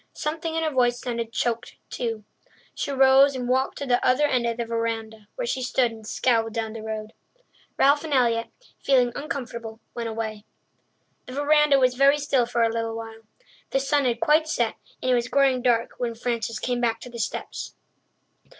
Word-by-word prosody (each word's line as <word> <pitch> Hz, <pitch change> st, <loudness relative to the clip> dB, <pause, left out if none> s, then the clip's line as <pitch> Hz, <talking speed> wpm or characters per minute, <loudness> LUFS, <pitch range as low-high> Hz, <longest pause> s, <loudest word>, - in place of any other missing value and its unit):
Something 320 Hz, +1 st, -3 dB
in 325 Hz, -, 0 dB
her 315 Hz, -, 0 dB
voice 245 Hz, -2 st, +2 dB
sounded 235 Hz, -2 st, -4 dB
choked 235 Hz, +1 st, -2 dB, 0.2 s
too. 225 Hz, -3 st, -3 dB, 0.5 s
She -, -, -4 dB
rose 270 Hz, 0 st, +5 dB
and 250 Hz, -1 st, -3 dB
walked 260 Hz, +1 st, +1 dB
to 285 Hz, -, -4 dB
the 245 Hz, -2 st, +1 dB
other 255 Hz, +4 st, +3 dB
end 250 Hz, -4 st, +1 dB
of 230 Hz, 0 st, -2 dB
the 235 Hz, -, -2 dB
verandah, 225 Hz, -2 st, -3 dB
where -, -, -3 dB
she 265 Hz, -, -2 dB
stood 250 Hz, -1 st, +1 dB
and 220 Hz, -1 st, -11 dB
scowled 225 Hz, -3 st, +1 dB
down 225 Hz, -1 st, -3 dB
the 225 Hz, -, -7 dB
road; 215 Hz, 0 st, -5 dB, 0.6 s
Ralph 285 Hz, +2 st, +4 dB
and 320 Hz, -, -6 dB
Elliott, 235 Hz, -4 st, +2 dB, 0.3 s
feeling 250 Hz, -3 st, +3 dB
uncomfortable, 235 Hz, -6 st, -5 dB
went 235 Hz, -1 st, -4 dB
away. 220 Hz, -2 st, -4 dB, 0.8 s
The 255 Hz, -, -8 dB
verandah 290 Hz, 0 st, +4 dB
was 255 Hz, -2 st, +3 dB
very 275 Hz, +3 st, +5 dB
still 275 Hz, -4 st, +1 dB
for 240 Hz, -1 st, +1 dB
a 225 Hz, 0 st, +1 dB
little 230 Hz, -1 st, -2 dB
while. 225 Hz, 0 st, -8 dB, 0.5 s
The 270 Hz, -, +1 dB
sun 280 Hz, +1 st, +1 dB
had 235 Hz, -2 st, 0 dB
quite 310 Hz, +1 st, +3 dB
set, 240 Hz, -7 st, 0 dB, 0.3 s
and 255 Hz, -, +2 dB
it -, -, +5 dB
was 240 Hz, 0 st, +1 dB
growing 270 Hz, -2 st, +3 dB
dark 240 Hz, -2 st, +2 dB
when 235 Hz, -2 st, -2 dB
Frances 230 Hz, -1 st, -2 dB
came 245 Hz, +2 st, -2 dB
back 230 Hz, -1 st, +1 dB
to 250 Hz, -, -9 dB
the 235 Hz, -, -8 dB
steps. 215 Hz, -, -4 dB
245 Hz, 190 wpm, -25 LUFS, 230-270 Hz, 0.8 s, rose